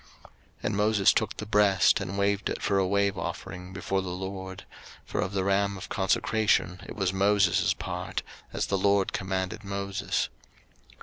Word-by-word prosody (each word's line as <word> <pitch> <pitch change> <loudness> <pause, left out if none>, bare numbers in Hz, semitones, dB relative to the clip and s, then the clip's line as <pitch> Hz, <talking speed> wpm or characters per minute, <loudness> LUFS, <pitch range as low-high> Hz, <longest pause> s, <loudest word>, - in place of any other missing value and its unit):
03:008:029 - - -18 0.3
And 105 - -1
Moses 105 -1 +4
took 110 -3 -1
the 105 - -5
breast, 100 -3 +4
and 100 -1 -4
waved 100 0 +1
it - - -3
for 100 - +1
a 95 - +2
wave 100 -1 +1
offering 90 +2 -6
before 95 +1 -1
the 95 - -5
LORD: 95 +1 -6 0.4
for - - -2
of 90 +2 -2
the 95 -1 0
ram 100 0 +1
of 95 - -8
consecration 105 -2 +1
it - - -7
was 95 -3 0
Moses' 100 -1 +3
part; - - -4 0.3
as - - -1
the 100 - 0
LORD 100 0 +2
commanded 95 +3 -2
Moses. 100 0 -2
100 Hz, 170 wpm, -28 LUFS, 95-100 Hz, 0.4 s, Moses